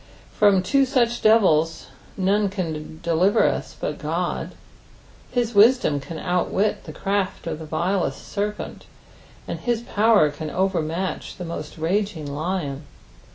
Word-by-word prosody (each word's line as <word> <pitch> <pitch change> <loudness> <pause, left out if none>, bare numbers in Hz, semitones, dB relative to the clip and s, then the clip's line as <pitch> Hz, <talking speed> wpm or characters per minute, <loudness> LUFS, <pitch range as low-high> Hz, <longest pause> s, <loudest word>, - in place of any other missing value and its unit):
From 200 -3 +4
two 275 +8 +3
such 240 -3 +1
deriis 175 -8 +3 0.3
none 200 +2 +2
can 160 -5 -5
deliver 170 +4 +3
us - - -3
but - - -3
Qod. - - -2 0.8
Hl3 240 -1 +1
wisdom 215 - +5
can 160 +4 -8
outwit 180 +4 0
the - - -7
craft 195 -2 -2
of 160 -2 -4
the 160 - -7
vilest 170 -2 -1
serpent, 210 +1 -4 0.6
and - - -4
his 240 -2 -1
power 215 - +3
can 155 +2 -6
overmntch 180 -1 -2
the 180 - -5
most 160 -2 -6
raging 180 0 -1
lion. 145 -1 -3
185 Hz, 130 wpm, -23 LUFS, 160-210 Hz, 0.8 s, wisdom